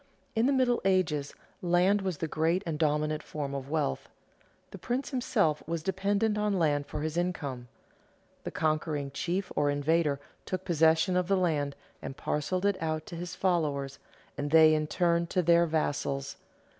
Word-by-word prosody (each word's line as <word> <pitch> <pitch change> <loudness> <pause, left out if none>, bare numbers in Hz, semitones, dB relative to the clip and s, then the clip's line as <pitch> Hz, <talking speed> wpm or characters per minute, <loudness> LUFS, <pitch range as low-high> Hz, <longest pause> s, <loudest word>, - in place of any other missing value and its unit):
In 225 +3 +3
the - - +3
Middle 255 -3 +2
Ages 175 -7 +1 0.3
land 180 +3 +3
was 185 -4 -2
the 160 - -2
great 165 +5 0
and 160 -3 -3
dominant 155 0 +1
form 145 -2 -5
of 135 0 -5
wealth. 150 - -1 0.6
The - - -9
prince 250 +5 -2
himself 205 - +1
was 165 -1 -3
dependent 200 +3 0
on 210 -2 +1
land 145 -4 +1
for 150 - -5
his 155 +1 -3
income. 140 -9 -2 0.8
The - - -4
conquering 155 -2 -1
chief 180 +6 -2
or 145 -1 +2
invader 145 0 +1 0.2
took 185 0 -4
possession 165 +1 +3
of 180 -1 +1
the 195 0 +2
land 150 -6 0 0.3
and 135 - -7
parceled 180 +6 -1
it 200 -2 +1
out 155 -1 -2
to 170 - -8
his 175 +1 -6
followers, 150 -8 0 0.4
and 145 - -2
they 160 0 +7
in 155 0 0
turn 170 +1 +1
to 180 +1 0
their 170 +1 +4
vassals. 140 -3 -1
165 Hz, 170 wpm, -29 LUFS, 150-185 Hz, 0.8 s, they